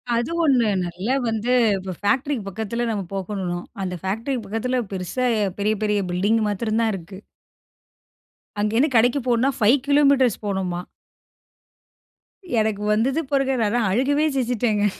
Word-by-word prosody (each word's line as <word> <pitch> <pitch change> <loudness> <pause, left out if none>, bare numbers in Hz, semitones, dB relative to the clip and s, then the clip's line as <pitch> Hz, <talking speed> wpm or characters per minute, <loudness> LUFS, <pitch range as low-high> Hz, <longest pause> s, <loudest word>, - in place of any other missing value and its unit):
அது 235 +4 0
ஒண்ணு. 255 -7 +3 0.2
நல்லா 185 +9 -2
வந்து 225 +2 -1 0.3
இப்போ 190 0 -6
ஃபேக்ட்ரிக்கு 245 +3 0
பக்கத்துல, 220 +4 -3
நம்ம 205 -3 -2
போகணும் 185 -2 -3
ம். - - -25 0.2
அந்த 180 -1 -3
ஃபேக்ட்ரிக்கு 225 +6 -2
பக்கத்துல 225 +5 -1
பெருசா 190 +7 -2 0.3
பெரிய 210 +2 +1
பெரிய 210 -1 +1
பில்டிங் 205 +6 +2
மாத்ரந்தான் 220 +2 0
இருக்கு. 190 +1 -10 1.4
அங்கேருந்து 225 +8 +2
கடைக்கு 245 +4 +4
போணும்ன்னா, 245 +3 +2
5 225 +6 +4
கிலோமீட்டர்ஸ் 280 -5 +3
போகணுமா. 190 -3 -2 1.8
எனக்கு 215 -1 0
வந்தது 255 +8 +1
பாருங்க! 270 -1 +2
நான்லாம். 220 +1 +1
அழுகவே 285 +8 +2
செஞ்சிட்டேங்க. 235 -4 +1
220 Hz, 125 wpm, -22 LUFS, 200-250 Hz, 1.8 s, கடைக்கு